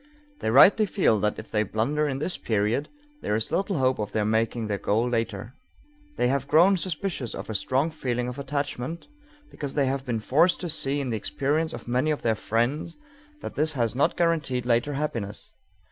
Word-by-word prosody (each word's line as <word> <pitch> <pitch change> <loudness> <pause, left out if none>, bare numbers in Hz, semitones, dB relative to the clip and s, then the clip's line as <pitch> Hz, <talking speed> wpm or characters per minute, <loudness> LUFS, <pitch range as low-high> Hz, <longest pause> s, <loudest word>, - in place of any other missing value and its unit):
They - - -1
rightly 190 - +7
feel 150 - +2
that 105 +1 0
if 110 - -9
they 105 - +2
blunder 140 +9 0
in 135 -2 -2
this 165 +6 -1
period, 110 +6 0 0.3
there 105 - -1
is 110 - -2
little 195 -1 0
hope 130 -2 +2
of 105 -1 -4
their 105 -1 +1
making 110 +1 0
their 100 -2 -2
goal 115 +4 +1
later. 115 -1 -2 0.6
They - - +2
have 135 +1 0
grown 175 +7 +5
suspicious 170 - -3
of - - -6
a - - -3
strong 130 +9 0
feeling 125 -5 -2
of 125 +2 -6
attachment, 140 +2 -3 0.5
because 140 -2 -5
they 140 -2 +3
have 135 0 -1
been 120 -4 -2
forced 155 +10 +3
to 175 - -3
see 145 -2 0
in 130 -3 -3
the 110 - 0
experiences 150 +8 -1
of - - -18
many 125 +5 +1
of 150 - -1
their 115 - +3
friends 120 +9 -1 0.4
that - - -6
this 155 +1 0
has 120 -5 0
not 135 +3 +1
guaranteed 155 -8 0
later 120 +4 +1
happiness. 115 -8 -4
130 Hz, 195 wpm, -26 LUFS, 115-150 Hz, 0.6 s, rightly